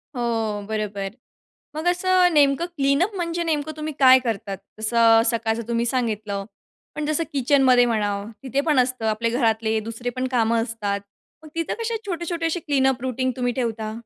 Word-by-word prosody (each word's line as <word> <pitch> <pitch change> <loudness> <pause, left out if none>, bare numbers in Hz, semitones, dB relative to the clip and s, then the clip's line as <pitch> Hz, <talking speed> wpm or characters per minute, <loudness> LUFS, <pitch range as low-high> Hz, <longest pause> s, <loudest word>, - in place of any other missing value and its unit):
हो. 225 -3 -1
बरोबर. 205 -2 -3 0.7
मग 310 +2 -4
असं 360 0 +3
नेमकं 290 +2 +3
क्लीनअप 325 +2 +1
म्हणजे 340 -1 -2
नेमकं 310 -2 -1
तुम्ही 305 0 -4
काय 260 -1 +8
करतात? 215 -5 -3 0.2
जसं 220 +2 -1 0.2
अ, - - +5
सकाळचं 225 0 0
तुम्ही 235 0 0
सांगितलं, 215 -5 -2 0.5
पण 300 - -3
जसं 310 +2 0
किचनमध्ये 260 -2 +4
म्हणा, 215 -3 0 0.3
तिथे 270 +1 0
पण 295 -3 +2
असतं. 250 -2 0
आपले 220 +2 0
घरातले 225 -2 +1
दुसरे 230 +3 -5
पण 255 0 -1
कामं 230 -1 +2
असतात. 210 -3 -3 0.4
मग 310 - -12
तिथं 330 -1 -1
कसे 460 0 -1
छोटे-छोटे 340 -2 -3
असे 330 +2 0
क्लीनअप 265 -4 +1
रुटीन 255 0 -1
तुम्ही 245 -1 0
ठेवता? 225 -3 -3
250 Hz, 160 wpm, -23 LUFS, 225-300 Hz, 0.7 s, काय